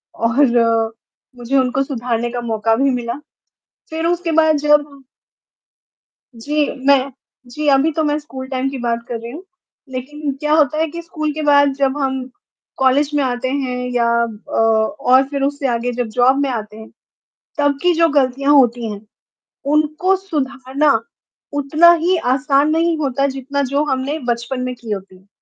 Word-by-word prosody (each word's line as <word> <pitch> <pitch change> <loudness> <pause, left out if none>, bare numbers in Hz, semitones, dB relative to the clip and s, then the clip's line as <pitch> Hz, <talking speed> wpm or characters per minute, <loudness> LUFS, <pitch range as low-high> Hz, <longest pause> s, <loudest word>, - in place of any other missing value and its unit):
और 230 -2 +2 0.4
मुझे 245 +3 -1
उनको 260 +1 +1
सुधारने 240 -3 -2
का 245 - -4
मौका 225 -1 0
भी 275 +3 +2
मिला। 240 -2 -2 0.8
फिर 320 +1 -3
उसके 350 -1 -1
बाद 315 0 +4
जब 295 0 +4 1.5
जी, 290 +6 -1 0.2
मैं 275 -1 +4 0.4
जी, 300 +5 -4
अभी 280 +3 +3
तो 315 - 0
मैं 295 0 +1
स्कूल 265 -3 -9
टाइम 265 0 -1
की 270 - -6
बात 235 0 -1
कर 235 - -3
रही 235 +1 -8
हूँ। 330 +7 -9 0.5
लेकिन 280 +3 -5
क्या 300 +1 0
होता 305 -1 +3
है, 320 +1 +1
कि 340 +3 -7
स्कूल 310 -3 -4
के 310 - -4
बाद 285 -1 +4
जब 275 0 0
हम 265 -2 -1 0.5
कॉलेज 265 +2 +3
में 285 - +2
आते 255 0 -2
हैं 260 -2 -2 0.2
या 235 -1 +2 0.2
अ, 225 -2 -6 0.4
और 260 -1 +4
फिर 280 -1 -3
उससे 280 -1 -1
आगे 240 0 -1
जब 245 -1 -3
जॉब 255 +2 +4
में 280 -1 0
आते 215 -3 -5
हैं, 220 0 -11 0.7
तब 285 -1 +1
की 360 - +4
जो 330 0 +3
गलतियाँ 275 -1 +2
होती 240 -4 +3
हैं, 200 - -8 0.7
उनको 310 +5 +2
सुधारना, 280 -6 0 0.5
उतना 300 +4 +5
ही 370 +1 +3 0.2
आसान 280 +2 +2
नहीं 330 +1 +1
होता, 275 -1 0
जितना 275 +1 -3
जो 285 +2 +2
हमने 265 +4 -1
बचपन 240 +2 -2
में 255 0 -3
की 235 -2 -11
होती 195 -2 -6
हैं। 190 - -27
275 Hz, 170 wpm, -18 LUFS, 245-295 Hz, 1.5 s, उतना